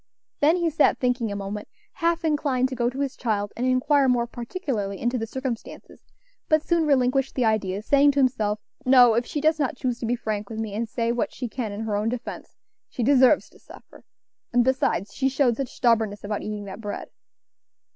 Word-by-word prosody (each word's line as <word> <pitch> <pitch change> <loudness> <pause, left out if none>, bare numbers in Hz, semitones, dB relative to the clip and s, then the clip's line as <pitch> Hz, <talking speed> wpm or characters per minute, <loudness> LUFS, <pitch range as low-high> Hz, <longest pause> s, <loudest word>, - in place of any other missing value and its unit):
Then 305 +4 +4
he 340 -2 0
sat 300 0 +3
thinking 245 -3 0
a - - -3
moment, 200 +1 -5 0.3
half 335 0 0
inclined 280 -4 +1
to 260 - -5
go 240 0 +1
to 265 +3 -5
his 275 -2 -2
child 205 -4 -2
and 250 +2 -1
inquire 270 +2 +3
more 240 -1 +2
particularly 235 - -4
into 240 +1 -1
the 225 - -3
circumstances, 260 -1 -6 0.5
but 310 0 +3
soon 335 -2 +1
relinquished 270 -1 +2
the 255 - +1
idea, 205 -2 0
saying 285 +4 +4
to 280 - 0
himself, 215 -5 +1 0.2
"No; 250 -2 +6
if 235 +2 0
she 295 - -3
does 310 +1 +2
not 265 -3 -1
choose 245 -2 -2
to 230 - -3
be 240 - +1
frank 215 -3 -4
with 225 - -6
me, 220 -2 -4
and 225 +2 -3
say 230 +1 -1
what 235 -2 -1
she 250 - -5
can 230 -2 -4
in 205 +2 -5
her 220 -2 -2
own 210 +2 0
defence, 245 0 -6 0.3
she 245 - -3
deserves 265 +2 +4
to - - -20
suffer; - - -16 0.5
and 245 0 +4
besides, 235 -6 0
she 270 0 +1
showed 260 -3 +2
such 270 0 -3
stubbornness 225 -4 +1
about 205 0 -3
eating 210 -1 -5
that 200 +2 -8
bread." 205 -1 -6
245 Hz, 205 wpm, -24 LUFS, 220-270 Hz, 0.5 s, No